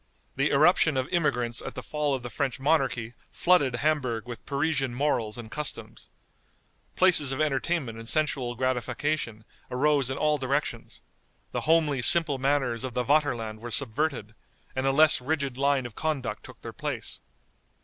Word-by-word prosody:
The 140 +2 +1
irruption 155 0 +4
of 130 0 -1
immigrants 125 -9 0
at - - -7
the 125 - -6
fall 150 -2 -1
of 130 - -6
the 120 - -6
French 140 -2 -2
monarchy 135 -5 0 0.2
flooded 145 -9 +2
Hamburg 125 -4 -1
with 120 -2 -8
Parisian 140 -3 0
morals 120 -6 -1
and 115 -2 -9
customs. 150 -1 -5 0.9
Places 175 -7 +4
of 135 - -3
entertainment 140 -4 -1
and 115 0 -5
sensual 140 -6 0
gratification 125 -1 -2 0.2
arose 140 0 +1
in 130 - -3
all 150 -1 +1
directions, 135 +3 -3 0.5
the - - -2
homely, 155 -5 +3
simple 155 0 +5
manners 135 -4 0
of 130 -2 -5
the 125 - +1
Vaterland 120 -6 +1
were 120 +2 -7
subverted, 125 -2 -1 0.4
and 130 +1 0
a - - +4
less 155 0 +5
rigid 140 -1 -2
line 140 -1 +1
of 120 - -7
conduct 150 -2 -3
took - - -14
their - - -7
place. - - -5
135 Hz, 160 wpm, -27 LUFS, 125-150 Hz, 0.9 s, simple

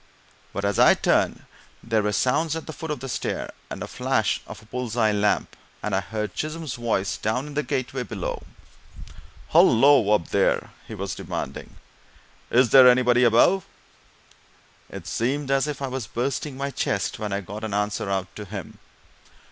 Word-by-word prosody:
But 100 +1 -3
as 100 -1 0
I - - +7
turned - - +1 0.4
there 115 -2 +1
were 105 0 0
sounds 145 +9 +1
at 160 - -5
the 160 - -7
foot 160 - -7
of 150 -5 -3
the 135 - -5
stair, 125 - -3 0.2
and - - -6
the - - -6
flash - - 0
of - - -9
a 110 - -18
bull's 125 0 -5
eye 110 -2 +3
lamp, 105 0 0 0.3
and 105 -2 -1
I - - +2
heard 105 +2 -4
Chisholm's 155 -2 -4
voice 115 -6 -1
down 110 +6 -1
in 150 - -8
the 150 - 0
gateway 130 -2 -3
below. 125 - -4 1.1
"Hullo, 130 -2 +6
up 85 - -3
there!" - - +1 0.2
he - - -7
was - - -4
demanding. - - -6 0.7
"Is 125 -1 +4
there 130 -2 +9
anybody 125 0 +4
above?" 125 - +4 1.3
It - - -9
seemed 135 +4 -1
as 135 +2 +2
if 145 -2 -4
I - - -1
was 130 -4 -4
bursting 130 +4 -3
my 140 +1 -3
chest 100 -6 -2
when 105 -1 -3
I 100 +1 -1
got 105 +4 -8
an 105 -2 -3
answer 105 0 -1
out 95 -2 -2
to 105 - -6
him. 95 - -8
120 Hz, 180 wpm, -24 LUFS, 105-135 Hz, 1.3 s, there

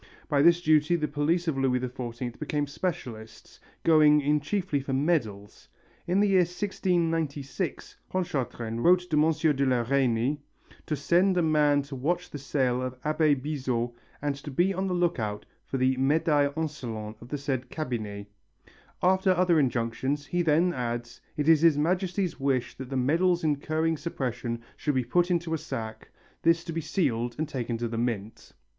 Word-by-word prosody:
By 145 -3 +2
this 170 +3 +5
duty 155 +2 +4
the 155 -3 -1
police 155 +4 0
of 145 -4 0
Louis 130 -1 +2
XIV 125 -1 -5
become 150 -1 -1
specialists, 125 -8 -6 0.2
going 150 -2 +6
in 150 +1 +2
chiefly 170 0 -1
for 135 0 -4
medals. 130 - -1 0.4
In 180 +3 +2
the 205 - +4
year 195 -2 +4
1696 170 -4 -1
Pontchartrain 130 -10 -3
wrote 180 +6 +4
to - - +2
M. 155 -1 +2
de 140 - +1
la 130 -3 +2
Reynie 130 +2 +1 0.5
"to 155 - 0
send 180 +6 +2
a 175 - +3
man 150 -2 +3
to 140 0 -8
watch 170 +7 -2
the 145 - -6
sale 130 -3 0
of 130 0 -5
Abbé 155 -2 +2
Bizot 130 -4 -2 0.3
and 140 -1 -4
be 185 +5 +3
on 190 +1 -2
the 180 - -1
look 175 -4 +1
out 105 -2 -3 0.2
for 135 - -2
the 130 0 +2
médailles 145 +1 +2
insolentes 115 -9 -5
of 120 - -12
the 145 - -2
said 130 -3 -3
cabinet." 110 -9 -4 0.8
After 190 +1 +3
other 175 -2 +3
injunctions, 130 +2 -1
he 175 +5 -1
then 170 +2 +3
adds: 120 -2 -4 0.2
"It 150 0 -1
is 160 -2 +6
His 165 -3 +5
Majesty's 180 +3 0
wish 135 -2 0
that 130 -1 -7
the 135 - -2
medals 170 +7 +2
incurring 155 +2 0
suppression 120 -6 -4
should 150 -2 -1
be 130 - +2
put 175 +5 +2
into 170 -2 0
a 160 - -1
sack, 110 -4 -6 0.3
this 165 0 +3
to 170 - -6
be 165 - -2
sealed 125 -8 -1
and 155 - -1
taken 120 -5 -3
to 120 +1 -2
the 115 0 -3
mint...." 115 -3 -4
145 Hz, 170 wpm, -27 LUFS, 125-165 Hz, 0.8 s, going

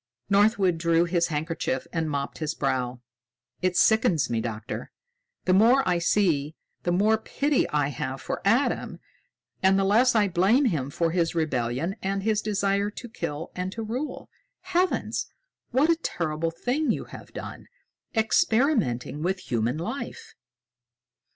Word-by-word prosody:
Northwood 200 -4 +3
drew 170 0 +3
his 170 -1 +1
handkerchief 155 -3 -2
and 160 -2 -1
mopped 140 -1 -3
his 155 -1 -2
brow. 130 -2 -1 0.6
"It 180 -1 +1
sickens 185 - +3
me, 115 -1 0
Doctor! 110 -1 -5 0.6
The 185 - +3
more 235 +7 +5
I 180 -1 +2
see, 165 -5 +1 0.3
the 175 - -1
more 210 +5 +3
pity 285 +5 0
I 145 -1 +1
have 135 0 -4
for - - -4
Adam 230 +8 +1 0.6
and 190 0 +4
the 195 - +2
less 230 +6 +4
I 210 -2 +4
blame 195 +10 +3
him 150 - 0
for 165 +3 0
his 170 -1 0
rebellion 150 - -1
and 195 0 -2
his 215 -1 +1
desire 200 -1 0
to 240 +3 -9
kill 155 -7 -5
and 180 +1 -3
to 225 - -5
rule. 250 +7 -4 0.3
Heavens! 370 0 0 0.4
What 280 +7 +3
a - - +4
terrible 165 -1 -2
thing 250 - -1
you - - 0
have - - -12
done, - - -8 0.5
experimenting 220 - +1
with 185 0 -3
human 120 +3 0
life." 225 - -6
185 Hz, 145 wpm, -26 LUFS, 155-220 Hz, 0.6 s, more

